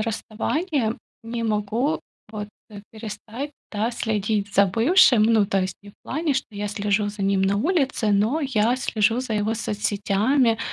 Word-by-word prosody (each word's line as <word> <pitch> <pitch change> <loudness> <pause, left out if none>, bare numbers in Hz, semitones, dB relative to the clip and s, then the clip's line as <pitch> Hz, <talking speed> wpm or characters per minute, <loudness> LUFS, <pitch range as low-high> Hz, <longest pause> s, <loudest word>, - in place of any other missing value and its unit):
расставания 225 - -1 0.3
не 230 +1 -4
могу 220 +6 0 0.3
вот, 210 -1 -5 0.2
э, 205 -1 -9
перестать, 225 +5 -7 0.2
да, 215 +2 -1
следить 210 -3 -1
за 200 +1 +6
бывшим. 245 - +5
Ну, 220 -2 +4
то 195 -1 +1
есть 185 0 -2
не 205 - -12
в - - -26
плане, 310 0 -1
что 270 - -1
я 205 0 -4
слежу 205 0 0
за 205 -1 -6
ним 195 0 +2
на 195 +1 +2
улице, 270 - +1
но 215 +10 +2
я 245 -5 +1
слежу 230 -2 +1
за 255 -4 -3
его 210 +1 0
соцсетями, 215 +3 +1
220 Hz, 160 wpm, -23 LUFS, 205-250 Hz, 0.3 s, за